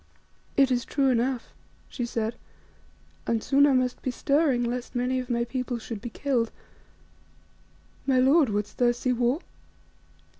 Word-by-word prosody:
"It 275 -1 +5
is 245 -1 +1
true 275 -2 +1
enough," 245 0 0 0.4
she 245 - -4
said, 225 -1 -2 0.9
"and 225 -1 0
soon 280 +1 +4
I 280 - +3
must 255 -1 0
be - - -2
stirring 275 -1 +2
lest 245 +1 -4
many 250 +1 0
of 250 0 -6
my 235 -1 +1
people 245 +1 -3
should 225 -2 -7
be 240 - -5
killed. 240 -2 0 1.6
My 265 -1 +3
lord, 270 +2 +5
wouldst 205 0 -3
thou 240 -1 +4
see 250 +1 -1
war? 245 +6 +1
250 Hz, 150 wpm, -26 LUFS, 235-265 Hz, 1.6 s, It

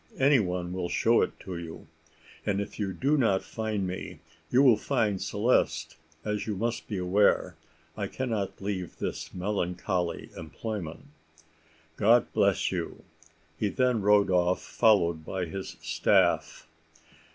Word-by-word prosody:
Any 135 0 +5
one 90 -3 -2
will 90 -1 -3
show 115 +1 +3
it - - -2
to 90 -2 -6
you; 80 -1 -9 0.6
and 100 -1 0
if 100 - -5
you 100 -2 -1
do 140 +10 +1
not 105 -8 +2
find 110 -3 -3
me 90 0 -5 0.3
you 130 +3 +4
will 125 -5 +7
find 105 -4 0
Celeste, 95 -7 +1 0.3
as 105 0 -2
you 105 - -1
must 115 +3 -2
be 105 - -3
aware 95 +3 +2 0.4
I - - -3
cannot 105 -7 -3
leave 95 -3 -4
this - - -4
melancholy 90 -2 -2
employment. 85 - -6 0.9
God 115 +3 +4
bless - - +2
you!" - - -4 0.6
He 105 - +1
then 125 +2 +1
rode 105 -1 +4
off 90 0 +2
followed 85 -8 +3
by 90 +2 -3
his 95 +3 -7
staff. - - +2
100 Hz, 140 wpm, -28 LUFS, 90-110 Hz, 0.9 s, will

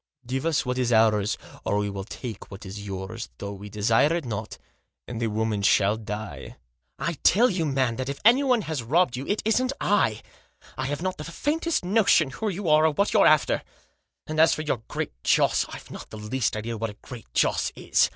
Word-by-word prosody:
Give 130 +5 -2
us 160 -4 +1
what 125 0 -1
is 125 -1 +1
ours, 110 -2 +3 0.3
or 100 - 0
we 105 0 0
will 100 -1 -5
take 115 -1 -8
what 100 -1 -10
is 100 +2 -7
yours, 95 -7 -6
though 100 0 -5
we 100 +1 -9
desire 110 +8 +2
it 170 -4 -3
not, 110 -2 -5 0.5
and 120 -1 -5
the 115 - +1
woman 110 -1 -1
shall 100 +1 +4
die." 105 -9 -7 0.2
" 65 +1 -51
I 170 -4 -3
tell 235 +5 +5
you, 170 -4 -1
man, 130 -4 0
that 130 +1 -3
if 140 - -4
anyone 250 -1 +5
has 155 -5 -3
robbed 140 +3 +2
you 130 +2 -5
it 205 - -1
isn't 255 +4 +2
I. 195 - +1 0.5
I 130 - -3
have 145 +4 -3
not 185 0 -2
the - - -4
faintest 305 - -1
notion 180 -7 +4
who 220 +8 -3
you 195 -1 -4
are, 155 0 +5
or - - +2
what 200 +7 +1
you're - - +6
after; 155 -1 +3 0.6
and 155 0 -3
as 160 +1 +6
for 155 - -4
your 140 -6 -1
Great - - -4
Joss, - - +3
I've - - -10
not - - -9
the 110 - -9
least 110 +2 -1
idea 115 +1 -4
what 115 0 -2
a 105 - -10
Great 125 -4 -10
Joss - - +2
is. - - +2
125 Hz, 215 wpm, -25 LUFS, 105-165 Hz, 0.6 s, you're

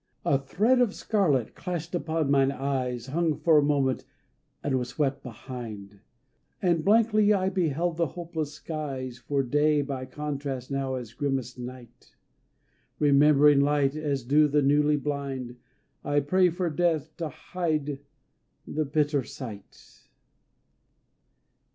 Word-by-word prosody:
A 140 - +3
thread 215 - +2
of 230 -5 +1
scarlet 155 - +1
clashed 175 -2 -5
upon 160 -4 -1
mine 135 -1 +4
eyes 130 -3 -2
Hung 160 +3 0
for 160 -3 +5
a - - +2
moment 140 -3 +1 0.6
and 130 -2 +1
was 125 -1 -4
swept 140 0 -1
behind, 110 -5 -8 0.6
And 170 -3 +1
blankly 215 0 +4
I 190 -1 +1
beheld 170 -2 0
the 170 -1 +1
hopeless 160 -2 -5
skies 135 -6 -5
For 140 +2 -1
day 145 +3 +2
by 135 -2 -5
contrast 140 -3 -5
now 135 -1 -1
is 120 -3 -7
grimmest 130 -2 -2
night 125 -1 -10 0.8
Remembering 145 0 +5
light 140 0 +2
as 145 -4 -2
do 150 +5 +4
the 145 0 +2
newly 150 +2 +3
blind 135 -4 -4 0.5
I 145 0 +2
pray 180 +6 +3
for 175 0 -2
death 160 -1 0
to 165 -2 -3
hide 150 -3 -3 0.7
the 155 0 -2
bitter 145 0 +1
sight. 110 -6 -11
145 Hz, 130 wpm, -27 LUFS, 135-160 Hz, 0.8 s, for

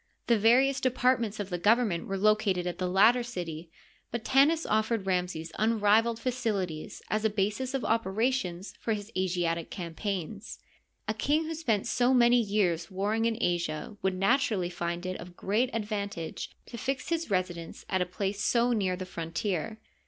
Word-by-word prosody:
The 235 -2 +3
various 260 +5 +4
departments 250 -4 +1
of 200 -2 -4
the 175 - -2
government 210 -3 +2
were 195 - -2
located 205 -3 +2
at 180 0 -4
the 180 -1 -1
latter 220 +7 +5
city, 175 -8 -6 0.4
but 235 -1 -4
Tanis 300 +5 +4
of 220 0 +1
fered 225 -5 -1
Ramses 180 -3 -1
unrivaled 220 +1 +3
facilities 215 -10 -3
as 215 0 0
a 220 - +3
basis 215 +6 -1
of 270 - -2
operations 215 -3 0
for 225 - -1
his 205 +1 -6
Asiatic 175 -3 -1
canipaigns. 195 +3 -5 0.5
A 215 - +1
king 290 +8 +1
who 325 - -3
spent 240 -11 0
so 250 +1 +2
many 240 0 +5
years 200 -6 0
warring 210 +4 0
in 230 -1 +1
Asia 170 -1 -1
would 190 -1 0
naturally 195 -3 +1
find 175 0 -3
it 185 0 -3
of 175 +1 -11
great 220 +6 +1
ad 225 -2 -2
vantage 200 -6 -4 0.2
to 235 - -8
fix 270 +6 -2
his 335 -3 -1
residence 180 -3 -3
at 190 -1 0
a - - +2
place 195 +2 -3
so 240 +3 +3
near 190 -5 0
the 185 +1 -6
frontier. 175 +4 -3
205 Hz, 170 wpm, -29 LUFS, 180-235 Hz, 0.5 s, latter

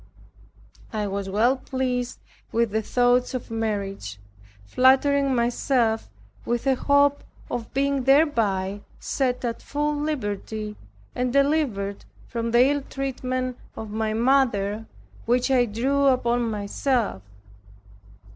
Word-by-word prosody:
I 215 -2 -2
was 195 -1 -3
well 230 +7 +3
pleased 255 -1 -2 0.3
with 230 -1 +1
the 220 +1 0
thoughts 245 +3 +2
of 245 - -5
marriage, 200 - -3 0.5
flattering 270 - +3
myself 235 -1 +1 0.3
with 240 +2 -2
a 270 - +4
hope 285 +2 +3 0.3
of 235 -2 -4
being 275 -1 +1
thereby 215 -9 +2 0.2
set 250 -2 -1
at 235 -1 -3
full 295 +1 -1
liberty, 215 -7 -3 0.4
and 250 0 -1
delivered 275 -8 +1 0.2
from 230 -1 -3
the 240 +2 +5
ill 285 +1 +1
treatment 255 -2 -3 0.2
of 220 -2 -7
my 220 0 -1
mother 225 -4 +2 0.4
which 245 +3 +2
I 250 -2 +4
drew 270 +6 +1
upon 240 -2 +2
myself. 215 - -1
245 Hz, 115 wpm, -24 LUFS, 220-270 Hz, 0.5 s, the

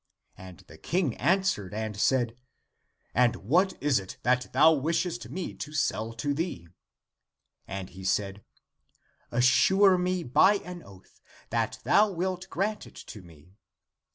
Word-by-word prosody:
And 90 -4 -12
the 80 - -16
King 165 - -1
answered 175 - 0
and 110 -1 -4
said, 120 +2 +1 0.4
" - - -48 0.3
And 120 -1 +3
what 175 - +1
is 145 -5 +2
it 95 -1 -10
that 125 +1 +1
thou 155 +5 +6
wishest 155 -4 -2
me 180 +7 -5
to 150 - -8
sell 115 -6 -1
to 145 +6 -2
thee? 140 - -4 0.5
" - - -50
And 95 -1 -7
he 95 +2 -11
said, 95 +1 -1 0.5
" - - -40
Assure 190 +10 +5
me 180 0 -1
by 175 +10 +4
an 180 -1 -8
oath 95 - -18 0.3
that - - -1
thou 210 +1 +4
wilt 185 +1 -3
grant 205 +4 -2
it - - -17
to 105 - -10
me." 85 0 -18
130 Hz, 155 wpm, -27 LUFS, -, 0.5 s, thou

